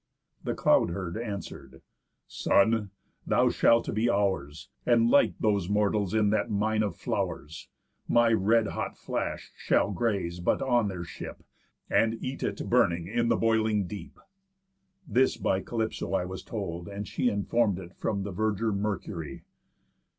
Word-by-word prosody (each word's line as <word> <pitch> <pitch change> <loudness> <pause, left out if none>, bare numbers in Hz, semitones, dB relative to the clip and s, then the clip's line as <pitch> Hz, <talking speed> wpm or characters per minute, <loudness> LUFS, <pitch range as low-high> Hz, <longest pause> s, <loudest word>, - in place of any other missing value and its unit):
The - - -2
Cloud - - +3
herd 85 -1 -4
answer'd: 100 - -7 0.4
'Son! 105 0 +2 0.4
Thou - - +4
shalt 115 0 +3
be 110 +3 +1
ours, 95 -9 -1 0.2
And 115 -1 +3
light 140 - +4
those 100 -4 +1
mortals 105 -1 +1
in 105 -2 +3
that 110 - 0
mine 110 +1 +1
of 100 -5 -1
flow'rs! 75 +2 -4 0.4
My 120 -1 +4
red 110 +1 +3
hot - - -4
flash - - -4
shall - - +1
graze 95 -4 -1
but 85 - +1
on 120 -5 +2
their 90 -3 -4
ship, 85 - -9 0.4
And 115 0 +2
eat 130 +1 -5
it, - - -3
burning, 85 -1 +2
in 115 +5 0
the - - +3
boiling 110 -3 +2
deep.' 100 +3 -9 0.9
This 130 -1 +2
by 95 - 0
Calypso 110 0 -3
I 90 - 0
was 95 0 -6
told, 90 -6 -5
and 100 +1 -6
she 125 - 0
Inform'd 105 -1 +1
it 90 -1 -9
from 100 -2 -2
the 100 - -4
verger 110 +3 0
Mercury. 100 -7 -4
105 Hz, 150 wpm, -28 LUFS, 95-115 Hz, 0.9 s, Thou